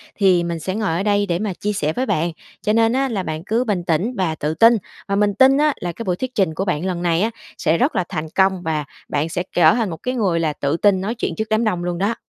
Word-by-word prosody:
thì 185 -4 +3
mình 170 -1 -3
sẽ 185 +4 -3
ngồi 215 -3 -1
ở 175 +4 -1
đây 205 -1 +2
để 175 -3 -1
mà 205 -2 -2
chia 210 +4 -3
sẻ 155 -6 -1
với 255 - -1
bạn, 170 -6 0 0.3
cho 210 - +1
nên 225 +1 +3
á 270 +1 +1
là 205 -6 -2
bạn 155 -1 -4
cứ 230 +4 +1
bình 205 -7 -1
tĩnh 175 +8 0
và 175 -4 0
tự 150 0 -2
tin. 230 +8 +6 0.3
Và 200 - 0
mình 205 0 +2
tin 265 +1 +5
á 300 0 +3
là 175 - -2
cái 205 +7 -7
buổi 180 -4 0
thuyết 255 +7 -4
trình 190 -7 +1
của 190 +4 -2
bạn 180 -3 -1
lần 180 -2 -2
này 170 -1 +1
á 220 +2 +1 0.3
sẽ 160 - +1
rất 270 - +1
là 185 - +2
thành 155 +1 -3
công, 190 -1 +3
và 155 -3 -1 0.2
bạn 150 +2 -1
sẽ 175 +2 -2
trở 165 -2 +6
thành 230 -4 0
một 165 - -5
cái 255 - -1
người 190 -8 +1
là 160 -2 0
tự 145 +2 -1
tin 195 0 +3
nói 215 +5 -2
chuyện 205 -8 -3
trước 220 0 -3
đám 220 +1 +2
đông 180 -6 0
luôn 175 -1 -2
đó. 200 +6 0
190 Hz, 295 wpm, -20 LUFS, 170-220 Hz, 0.3 s, tin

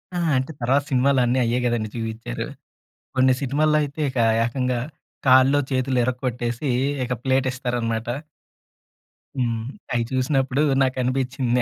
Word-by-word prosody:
ఆ! - - 0 0.2
అంటే 130 +4 -2
తర్వాత 135 +4 +2
సినిమాలన్నీ 130 -1 +3
అయ్యే 120 +2 +1 0.4
చూయిచారు. 110 - -4 0.7
కొన్ని 130 0 +5
సినిమాల్లో 150 +3 +2
అయితే 145 +1 -5
ఇక 130 - -5 0.3
ఏకంగా 125 +1 -1 0.5
కాల్లో 130 +2 +6
చేతులో 130 -1 0
ఇరక్కొట్టేసి 125 +1 -2 0.4
ఇక 125 - -3
ప్లేటిస్తారనమాట. 125 -4 -1 1.3
హ్మ్. 115 -4 -1 0.3
అయి 120 - +1
చూసినప్పుడు 130 +1 +1 0.2
నాకనిపించింది. 130 -1 0
130 Hz, 105 wpm, -23 LUFS, 120-135 Hz, 1.3 s, కాల్లో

